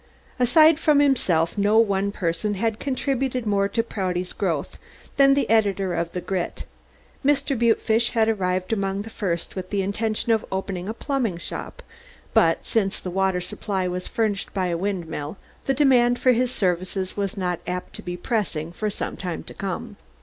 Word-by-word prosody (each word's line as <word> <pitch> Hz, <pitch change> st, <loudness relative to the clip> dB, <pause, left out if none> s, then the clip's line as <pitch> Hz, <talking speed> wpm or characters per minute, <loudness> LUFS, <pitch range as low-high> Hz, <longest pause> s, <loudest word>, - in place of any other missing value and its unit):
Aside 310 Hz, +6 st, +6 dB
from 300 Hz, -3 st, +4 dB
himself, 200 Hz, -, +2 dB
no 205 Hz, +2 st, +4 dB
one 200 Hz, -3 st, +3 dB
person 200 Hz, +3 st, -1 dB
had 225 Hz, +2 st, -1 dB
contributed 265 Hz, -2 st, -1 dB
more 200 Hz, -1 st, +2 dB
to 230 Hz, +3 st, 0 dB
Prouty's 185 Hz, -5 st, -3 dB
growth -, -, -2 dB, 0.4 s
than 275 Hz, 0 st, +6 dB
the 275 Hz, -4 st, +1 dB
editor 200 Hz, -4 st, +2 dB
of 170 Hz, 0 st, -1 dB
the 180 Hz, -, -3 dB
Grit. 185 Hz, -2 st, -3 dB, 0.6 s
Mr. 280 Hz, 0 st, +2 dB
Butefish 230 Hz, -1 st, +2 dB
had 225 Hz, -2 st, +3 dB
arrived 185 Hz, -2 st, 0 dB
among 195 Hz, -1 st, -1 dB
the 225 Hz, -, -10 dB
first 175 Hz, -6 st, -3 dB
with 185 Hz, -1 st, -5 dB
the 200 Hz, -2 st, 0 dB
intention 220 Hz, +3 st, -1 dB
of 220 Hz, -1 st, +2 dB
opening 190 Hz, 0 st, -3 dB
a 220 Hz, -, -3 dB
plumbing 250 Hz, -, -1 dB
shop, -, -, -7 dB, 0.5 s
but -, -, +3 dB
since 200 Hz, -4 st, 0 dB
the 180 Hz, -, -5 dB
water 190 Hz, 0 st, +1 dB
supply 185 Hz, +1 st, -2 dB
was 180 Hz, 0 st, -3 dB
furnished 215 Hz, -3 st, -1 dB
by 185 Hz, -2 st, 0 dB
a 170 Hz, -, 0 dB
windmill 170 Hz, -4 st, -3 dB, 0.3 s
the 270 Hz, -, +3 dB
demand 245 Hz, -4 st, +4 dB
for 255 Hz, -, +4 dB
his 250 Hz, +1 st, +2 dB
services 185 Hz, -2 st, -1 dB
was 200 Hz, -1 st, -2 dB
not 180 Hz, -3 st, -1 dB
apt 180 Hz, 0 st, -4 dB
to -, -, -7 dB
be 175 Hz, 0 st, -5 dB
pressing 175 Hz, -6 st, -2 dB
for 215 Hz, +4 st, -2 dB
some -, -, -4 dB
time 180 Hz, -3 st, -4 dB
to -, -, -10 dB
come. 200 Hz, +3 st, -5 dB
200 Hz, 175 wpm, -24 LUFS, 185-230 Hz, 0.6 s, Aside